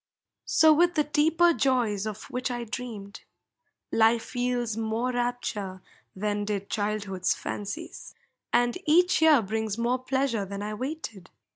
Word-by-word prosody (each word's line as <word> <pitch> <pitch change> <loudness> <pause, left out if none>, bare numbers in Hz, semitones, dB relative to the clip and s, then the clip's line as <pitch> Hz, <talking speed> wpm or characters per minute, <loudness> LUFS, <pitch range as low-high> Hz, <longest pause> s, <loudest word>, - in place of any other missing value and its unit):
So 315 -1 +6
with 345 +3 +3
the 305 - +3
deeper 320 +4 +3
joys 235 -8 +1
of 215 0 -6
which 255 +1 -2
I 240 -1 -3
dreamed: 220 -3 -7 0.7
Life 225 +1 +2
yields 245 -2 -1
more 225 +3 -1
rapture 240 -6 -3 0.3
than 205 +1 -1
did 200 -1 -3
childhood's 205 -3 -1
fancies, 250 +12 -6 0.4
And 240 +7 +2
each 355 +3 +4
year 305 -7 +6
brings 220 +1 -2
more 240 +2 0
pleasure 260 -4 0
than 200 +1 -6
I 210 +1 -4
waited. 230 - -6
235 Hz, 135 wpm, -27 LUFS, 210-265 Hz, 0.7 s, So